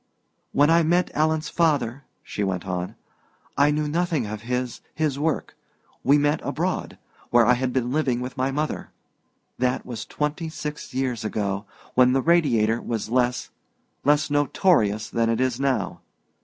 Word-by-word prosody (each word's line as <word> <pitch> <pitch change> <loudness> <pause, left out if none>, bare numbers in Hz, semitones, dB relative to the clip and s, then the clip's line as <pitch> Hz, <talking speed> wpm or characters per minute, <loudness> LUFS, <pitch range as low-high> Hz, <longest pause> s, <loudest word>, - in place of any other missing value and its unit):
"When 145 +3 +4
I 170 +1 +6
met 175 +2 +2
Alan's 155 0 +1
father," 145 -5 +1 0.2
she 105 - -3
went 95 -2 -2
on, 90 -1 -3 0.6
"I 145 +1 +4
knew 150 0 0
nothing 165 -4 0
of 105 0 -5
his 125 +1 -3
his 150 -3 0
work. 155 0 -1 0.5
We 140 +2 +5
met 145 +1 +1
abroad, - - -2 0.3
where 120 -1 +5
I 125 - +5
had 125 +1 -1
been 125 -1 -1
living 135 -4 +1
with 125 +1 -5
my 130 +1 0
mother. 150 +3 -2 0.7
That 125 0 0
was 120 -4 -6
twenty 150 +2 -2
six 150 -1 -6
years 130 -4 -1
ago, 100 -1 -2 0.3
when 125 0 +5
the 135 - +3
Radiator 120 -10 +3
was 110 -2 -3
less 125 0 0 0.5
less 145 0 +3
notorious 145 - +2
than 115 -1 0
it 115 - +1
is 130 -1 0
now. 135 -2 -1
130 Hz, 155 wpm, -24 LUFS, 120-150 Hz, 0.7 s, I